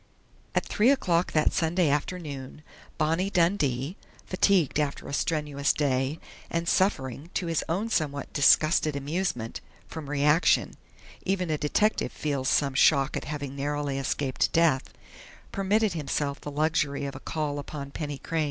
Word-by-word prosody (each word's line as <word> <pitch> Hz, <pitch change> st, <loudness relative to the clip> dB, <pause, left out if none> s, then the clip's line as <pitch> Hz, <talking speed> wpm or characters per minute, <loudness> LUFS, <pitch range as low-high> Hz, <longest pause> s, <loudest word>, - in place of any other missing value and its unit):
At -, -, +1 dB
three 220 Hz, +4 st, +3 dB
o'clock 180 Hz, -11 st, +2 dB
that 155 Hz, -1 st, +3 dB
Sunday 165 Hz, +1 st, +1 dB
afternoon 145 Hz, -2 st, -3 dB, 0.3 s
Bonnie 165 Hz, +5 st, +1 dB
Dundee, 165 Hz, -5 st, +1 dB, 0.3 s
fatigued 185 Hz, -6 st, +2 dB
after 145 Hz, -2 st, -2 dB
a -, -, -6 dB
strenuous 150 Hz, -2 st, 0 dB
day, 135 Hz, 0 st, 0 dB, 0.3 s
and 170 Hz, 0 st, -2 dB
suffering, 145 Hz, -, 0 dB
to 185 Hz, -, 0 dB
his 165 Hz, -2 st, 0 dB
own 205 Hz, +7 st, -1 dB
somewhat 145 Hz, -5 st, -1 dB
disgusted 155 Hz, +1 st, +4 dB
amusement, 140 Hz, -5 st, -2 dB, 0.3 s
from 155 Hz, -4 st, -7 dB
reaction 150 Hz, +3 st, +3 dB, 0.5 s
even 185 Hz, -3 st, -1 dB
a 155 Hz, -, +1 dB
detective 210 Hz, +9 st, +1 dB
feels 140 Hz, -4 st, -2 dB
some 140 Hz, -2 st, +2 dB
shock 140 Hz, 0 st, +4 dB
at -, -, -3 dB
having 140 Hz, -2 st, -5 dB
narrowly 145 Hz, 0 st, -2 dB
escaped 135 Hz, -1 st, 0 dB
death 160 Hz, -5 st, +2 dB, 0.6 s
permitted 200 Hz, +1 st, +1 dB
himself 145 Hz, -2 st, -2 dB
the -, -, -6 dB
luxury 145 Hz, -1 st, 0 dB
of 140 Hz, -, -5 dB
a -, -, -7 dB
call 150 Hz, -1 st, -3 dB
upon 140 Hz, -1 st, -7 dB
Penny 145 Hz, -1 st, -4 dB
Crain. 165 Hz, +4 st, -3 dB
150 Hz, 145 wpm, -27 LUFS, 140-170 Hz, 0.6 s, disgusted